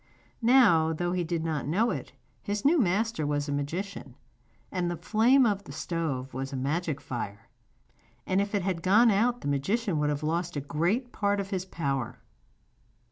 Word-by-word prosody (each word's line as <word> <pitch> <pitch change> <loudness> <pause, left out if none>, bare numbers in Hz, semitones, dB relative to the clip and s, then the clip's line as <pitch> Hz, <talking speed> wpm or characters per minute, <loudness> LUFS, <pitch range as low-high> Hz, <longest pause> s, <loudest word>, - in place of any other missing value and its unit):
Now, 225 -10 +5
though 175 +2 -2
he 180 -1 0
did 170 -1 -2
not 155 -4 -2
know 210 +10 +2
it, - - -5 0.3
his 205 +2 -3
new 320 +3 +5
master 215 - +1
was 145 0 -1
a - - -2
magician, 165 +8 -4 0.6
and 180 -2 -1
the 175 - -3
flame 245 +8 +4
of 205 -3 0
the - - -9
stove 140 -7 -3
was 135 +2 -4
a - - -4
magic 145 +3 -1
fire, 105 -7 -6 0.8
and 190 +1 +2
if 200 +1 -2
it 200 - 0
had 185 -3 -1
gone 215 +6 +5
out 235 +4 +1
the - - -4
magician 165 - 0
would 150 0 +1
have 145 +1 -2
lost 170 +2 -1
a - - 0
great 175 - -1
part 205 -1 0
of 195 0 -4
his 185 -1 -2
power. 135 -9 -3
175 Hz, 185 wpm, -28 LUFS, 145-205 Hz, 0.8 s, Now